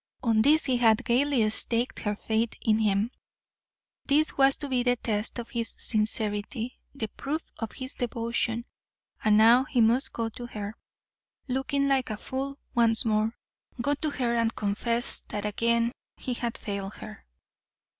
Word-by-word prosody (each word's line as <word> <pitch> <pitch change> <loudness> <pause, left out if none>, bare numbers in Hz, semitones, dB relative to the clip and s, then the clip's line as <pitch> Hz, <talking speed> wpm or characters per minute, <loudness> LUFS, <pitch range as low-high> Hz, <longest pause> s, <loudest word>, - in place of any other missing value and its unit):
On 225 -3 +3
this 300 +6 +4
he 260 -3 +2
had 230 0 +3
gaily 255 -2 +3
staked 235 +2 +2
her 210 -1 -2
faith 220 +2 -1
in 220 -1 +3
him. 210 +1 +1 1.0
This 300 +2 +3
was 270 0 +5
to 290 - -5
be 255 -2 +1
the 245 0 +2
test 220 -1 -1
of 235 -1 -6
his 230 -1 -2
sincerity, 215 +2 -2 0.2
the 225 -5 -3
proof 300 +8 -5
of 225 -2 -4
his 260 0 -5
devotion. 235 -1 -2 0.6
And 210 -1 +5
now 235 +4 +6
he 265 -3 -1
must 240 +7 +4
go 230 -1 -2
to 240 +2 -8
her, 210 -2 -6 0.7
looking 275 +2 0
like 270 -2 +1
a 215 - -3
fool 270 +4 -4 0.2
once 230 -1 +4
more 215 +1 +1 0.4
go 285 +5 +1
to 300 +2 -2
her 245 -4 -1
and 230 0 +1
confess 230 +3 -1
that 205 0 -4
again 235 +2 +1 0.3
he 255 - -3
had 235 -1 -3
failed 200 -1 -5
her. 215 -1 -10
235 Hz, 160 wpm, -27 LUFS, 220-255 Hz, 1.0 s, now